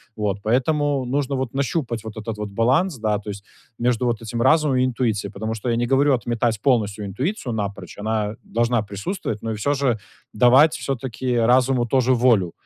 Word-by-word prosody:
Вот. 105 -2 -1
Поэтому 135 +4 +1
нужно 135 +2 -1
вот 130 -2 -3
нащупать 135 -4 -2
вот 110 -1 -8
этот 110 0 -5
вот 105 -1 -4
баланс, 130 - +1
да, 105 -2 0
то 105 - -9
есть, 100 0 -7 0.4
между 125 0 +1
вот 115 -2 0
этим 115 +1 -4
разумом 150 0 +3
и 125 - +3
интуицией, 115 -5 -1
потому 110 +2 -3
что 115 +3 -4
я 115 - +1
не 120 +1 0
говорю 140 +2 +3
отметать 115 -2 -1
полностью 105 -6 +1
интуицию 130 - -3
напрочь. 100 -4 -5
Она 110 0 -1
должна 120 0 0
присутствовать, 105 - -4
но 115 - -3
и - - -2
всё 140 +8 0
же 135 -5 +1 0.4
давать 130 +7 +6
всё-таки 130 -1 -3
разуму 125 +1 +3
тоже 130 +1 +2
волю. 115 -8 +3
120 Hz, 185 wpm, -22 LUFS, 110-130 Hz, 0.4 s, давать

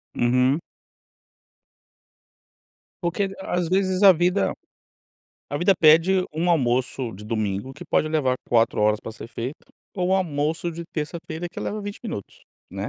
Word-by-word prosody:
Uhum. 125 +4 +3 2.4
Porque, 185 +3 -1
às 175 -3 -1
vezes, 190 +1 +1
a 195 - +10
vida 180 +3 +1 1.0
a 145 - -3
vida 175 +5 +4
pede 170 +4 +5
um 170 +3 +1
almoço 125 -4 0
de 105 +3 -11
domingo 105 +2 -2
que 175 - -10
pode 155 - +2
levar 145 -5 +1
4 115 -2 +3
horas 105 0 +3
para 110 - -7
ser 115 - -10
feito 125 +4 -6 0.3
ou 180 -1 0
um 190 - +3
almoço 160 -1 -1
de 170 +1 -6
terça-feira 160 +2 -4
que - - -7
leva 210 0 -3
20 205 0 -7
minutos, 105 - -7 0.3
né. - - -4
160 Hz, 145 wpm, -24 LUFS, 125-180 Hz, 2.4 s, a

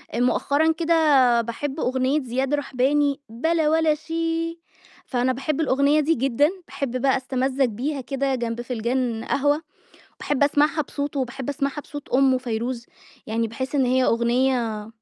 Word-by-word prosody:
مؤخرًا 285 +6 +2
كده 305 -8 +3
باحب 270 +6 -4
أغنية 260 +3 +1
زياد 260 +3 -2
رحباني: 285 +1 +1
"بلا 315 +6 +1
ولا 320 -1 +3
شي" 330 +1 -3 0.5
فأنا 255 0 0
باحب 275 +4 -2
الأغنية 280 +1 +3
دي 320 +2 +2
جدًا، 275 +4 +2 0.2
باحب 255 -2 -3
بقى 270 0 +3
أستمَّزج 260 +1 0
بيها 260 +5 -3
كده 270 +1 -1
جنب 235 -1 -3
فنجان 240 -1 -2
قهوة، 290 +2 +1 0.5
وباحب 290 -1 -1
أسمعها 295 +2 +3
بصوته، 285 0 -4
وباحب 260 +1 -4
أسمعها 280 +1 -2
بصوت 290 -1 -9
أُمُه 260 0 +3
فيروز، 240 0 -3 0.4
يعني 225 +1 -1
باحس 260 +5 -5
إن 270 -2 +3
هي 255 +1 +2
أغنية 235 -2 +1
270 Hz, 140 wpm, -23 LUFS, 245-295 Hz, 0.5 s, كده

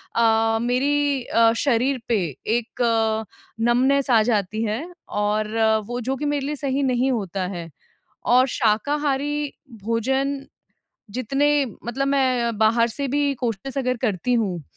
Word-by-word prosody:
अ, 225 -1 +3
मेरी 275 +2 +1
अ, 230 -1 +4
शरीर 260 0 +1
पे 230 -3 +2 0.4
एक 240 +1 -6 0.8
नम्बनेस 260 +4 +2
आ 225 -2 +6
जाती 215 -1 0
है 220 +4 -1 0.4
और 210 +1 0 0.3
वो 245 +1 -3
जो 265 +3 -2
कि 300 - -3
मेरे 290 -2 -1
लिए 300 +1 -2
सही 275 0 -1
नहीं 255 0 +1
होता 195 -5 -2
है। 175 -3 -6 0.7
और 255 +1 +5
शाकाहारी 285 +5 0 0.3
भोजन 265 +5 0 0.7
जितने 275 +5 +1 0.3
मतलब 275 +4 -1
मैं 260 -3 +2
अ, 235 - +1
बाहर 225 +2 +3
से 275 +4 -4
भी 285 +1 +1
कोशिश 245 +5 -3
अगर 255 -1 0
करती 220 +5 0
हूँ, 190 -8 -1
245 Hz, 140 wpm, -23 LUFS, 225-275 Hz, 0.8 s, आ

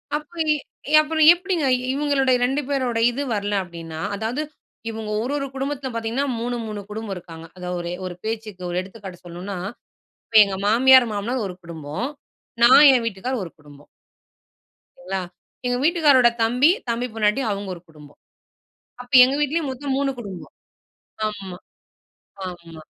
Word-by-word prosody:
அப்பவே 315 +2 -3 0.4
ஏ - - -2
அப்புறம் 315 0 +2
எப்படிங்க 350 -3 -2 0.3
இவங்களுடைய 275 -2 +2
2 270 +4 +1
பேருடைய 250 -5 0
இது 275 +4 -3
வரல 205 0 -1
அப்படின்னா, 165 -2 -9 0.2
அதாவது 225 +7 -2 0.5
இவங்க 220 -1 -6
ஒரு 245 +4 -3
ஒரு 275 - -2
குடும்பத்தில 270 0 -3
பார்த்தீங்கன்னா 230 +4 -1
3- 240 +1 -2
3 210 -2 -5
குடும்பம் 215 -1 -5
இருக்கிறாங்க. 165 -2 -10
அதாவது 180 0 -4
ஒரு 170 0 -5 0.2
ஒரு 180 - -7
பேச்சுக்கு, 215 -4 -5
ஒரு 175 +1 -1
எடுத்துக்காட்டு 190 -1 -11
சொல்லனும்னா, 180 +3 -6 0.7
இப்ப 225 - -1
எங்க 195 -1 -4
மாமியார், 255 +3 +6
மாமனார் 225 +4 -2
ஒரு 180 - -8
குடும்பம். 160 - -5 0.6
நான் 260 +5 +8
என் 245 -3 +2
வீட்டுக்காரர் 230 +3 -3
ஒரு 165 - -10
குடும்பம். 145 -1 -17 1.1
சரிங்களா? 190 +2 -4 0.5
எங்க 245 0 0
வீட்டுக்காரரோட 295 -7 +5
தம்பி, 250 +7 +4 0.2
தம்பி 235 +2 -1
பொண்டாட்டி 215 +3 +1
அவங்க 200 -1 -4
ஒரு 170 - -13
குடும்பம். 150 -2 -16 0.8
அப்ப 245 - -19
எங்க 260 +2 0
வீட்டிலேயும் 295 +1 0
மொத்தம் 270 +1 -3
3 280 0 +1
குடும்பம். 200 -6 -8 0.8
ஆமா. 195 -4 -7 0.9
ஆமா. 170 -3 -10
225 Hz, 145 wpm, -22 LUFS, 185-265 Hz, 1.1 s, நான்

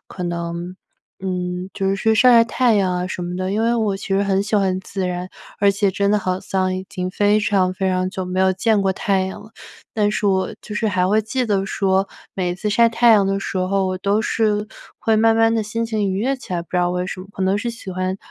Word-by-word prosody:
可 180 - -8
能， 170 +1 -4 0.4
嗯 180 -1 -3
就 195 - -1
是 195 - +1
去 220 +3 +2
晒 250 +3 +6
晒 230 -1 +7
太 240 -1 +2
阳 185 -2 +1
啊 180 0 -2
什 180 - -4
么 175 0 -4
的， 185 0 -2
因 210 +3 0
为 230 +1 +2
我 215 -4 0
其 - - -8
实 195 +1 +2
很 195 -1 +1
喜 210 +2 -2
欢 190 -2 +2
自 190 0 -4
然， 180 +1 -4 0.3
而 200 - +4
且 200 0 +1
真 200 +2 0
的 210 - +3
好 185 0 -1
像 185 -1 -1
已 190 0 -6
经 185 -1 -4
非 205 +2 +2
常 190 -3 +1
非 190 0 -1
常 185 0 0
久 190 -1 -4
没 180 +1 -3
有 190 0 +4
见 210 +2 +2
过 190 -1 +1
太 190 0 0
阳 190 0 -5
了。 215 - -15 0.4
但 210 -2 +1
是 210 - -1
我 190 -1 0
就 210 - -6
是 220 - 0
还 185 -2 +1
会 215 +2 +3
记 250 +4 -2
得 195 -3 0
说， 195 -1 +1 0.3
每 180 -2 -1
次 210 +3 -3
晒 230 +3 +5
太 235 +1 +4
阳 205 -3 +5
的 195 0 0
时 190 - -3
候， 190 +1 +1
我 185 0 -3
都 200 +3 +1
是 215 -1 0 0.3
会 220 -1 +2
慢 225 +1 +4
慢 225 0 +4
地 225 - +1
心 230 +2 -2
情 215 -3 -1
愉 190 +1 -1
悦 270 +3 0
起 220 - -10
来， 170 - -2
不 - - -20
知 180 - -1
道 175 0 +2
为 180 0 -1
什 185 - -6
么。 185 - -10
可 190 - -4
能 190 +2 +2
是 235 - -3
喜 230 -5 -7
欢， 185 +1 -2
195 Hz, 280 characters per minute, -20 LUFS, 185-215 Hz, 0.4 s, 晒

